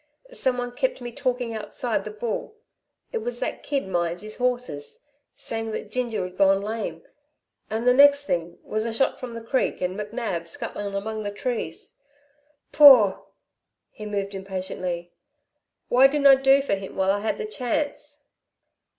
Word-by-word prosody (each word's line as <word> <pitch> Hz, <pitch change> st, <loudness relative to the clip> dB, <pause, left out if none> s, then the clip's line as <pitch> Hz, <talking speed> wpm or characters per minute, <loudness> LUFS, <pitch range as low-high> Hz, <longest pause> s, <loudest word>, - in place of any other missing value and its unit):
Someone 250 Hz, -, -1 dB
kept -, -, -1 dB
me 240 Hz, -1 st, -6 dB
talking 245 Hz, -1 st, -2 dB
outside 215 Hz, 0 st, -3 dB
the -, -, -4 dB
Bull 220 Hz, -, -4 dB, 0.6 s
it 465 Hz, -, -1 dB
was 485 Hz, +2 st, -3 dB
that -, -, -3 dB
kid 275 Hz, -7 st, -2 dB
minds 175 Hz, 0 st, -1 dB
his 215 Hz, 0 st, -8 dB
horses 245 Hz, -, -2 dB, 0.3 s
saying 225 Hz, 0 st, -4 dB
that 210 Hz, -, -6 dB
Ginger'd 220 Hz, -8 st, -3 dB
gone 195 Hz, 0 st, +5 dB
lame 220 Hz, +2 st, -4 dB, 0.7 s
and 225 Hz, +3 st, -2 dB
the 250 Hz, -, +7 dB
next 285 Hz, +2 st, +6 dB
thing 170 Hz, -7 st, -2 dB
was 215 Hz, 0 st, -2 dB
a 230 Hz, -, -2 dB
shot 265 Hz, +4 st, +1 dB
from 245 Hz, -2 st, -7 dB
the 230 Hz, -, -7 dB
creek 260 Hz, +3 st, 0 dB
and 180 Hz, 0 st, -2 dB
McNab 210 Hz, -5 st, -4 dB
scuttling 200 Hz, +4 st, -5 dB
among 215 Hz, +2 st, -3 dB
the 205 Hz, -, -3 dB
trees. 205 Hz, -5 st, -5 dB, 0.7 s
Paugh!" 255 Hz, -10 st, +8 dB, 0.7 s
he 215 Hz, -, -8 dB
moved 200 Hz, -1 st, -3 dB
impatiently, 185 Hz, -2 st, -5 dB, 0.8 s
"Why 255 Hz, +2 st, +6 dB
didn't 285 Hz, +1 st, -1 dB
I 275 Hz, -, +10 dB
do 270 Hz, +1 st, +5 dB
for 275 Hz, -, -1 dB
him 195 Hz, -1 st, -4 dB
while 190 Hz, 0 st, +2 dB
I 200 Hz, -, 0 dB
had 215 Hz, +2 st, -1 dB
the 445 Hz, -, -4 dB
chance." 295 Hz, -, -3 dB
225 Hz, 160 wpm, -25 LUFS, 195-255 Hz, 0.8 s, I